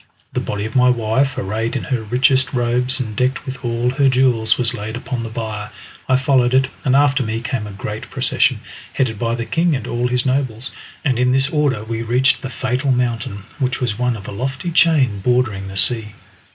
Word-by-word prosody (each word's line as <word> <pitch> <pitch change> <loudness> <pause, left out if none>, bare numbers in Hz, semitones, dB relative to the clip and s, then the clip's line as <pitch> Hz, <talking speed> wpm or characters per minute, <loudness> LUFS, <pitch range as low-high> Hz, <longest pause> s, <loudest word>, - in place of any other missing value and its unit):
The - - 0
body 105 0 -3
of 110 - -6
my 125 0 +5
wife, 125 +4 +1
arrayed 110 +3 -2
in 130 - -2
her 125 -4 -1
richest 130 +5 +2
robes 125 +2 +1
and 110 -4 -4
decked 130 +5 0
with 130 -1 -7
all 120 +1 0
her 135 +1 +3
jewels, 125 -3 +2
was 125 -1 0
laid 110 0 -5
upon 120 0 -4
the 115 - -5
bier. 110 -2 -5 0.4
I 130 - +5
followed 130 -1 +3
it, 130 0 +3
and 130 -1 +2
after 140 -1 +4
me 110 -2 -2
came 120 -3 -3
a - - -8
great 105 +2 -6
procession, - - +1 0.3
headed 115 -6 -1
by 115 -1 0
the 115 -1 -4
king 165 +2 +1
and 130 - -4
all 120 +1 -1
his 125 0 0
nobles, 130 -2 -1 0.3
and 130 -4 +1
in 125 0 +3
this 135 +1 +2
order 145 -8 +1
we 115 +1 -4
reached 125 +3 +2
the 130 - -5
fatal 130 +1 -1
mountain, 120 -5 -1 0.2
which 130 -1 0
was 120 -3 -2
one 125 -1 +1
of 100 - -10
a - - -5
lofty 130 - -3
chain 145 - +3
bordering 110 -3 0
the 95 0 -7
sea. 105 +1 +1
125 Hz, 210 wpm, -19 LUFS, 110-130 Hz, 0.4 s, my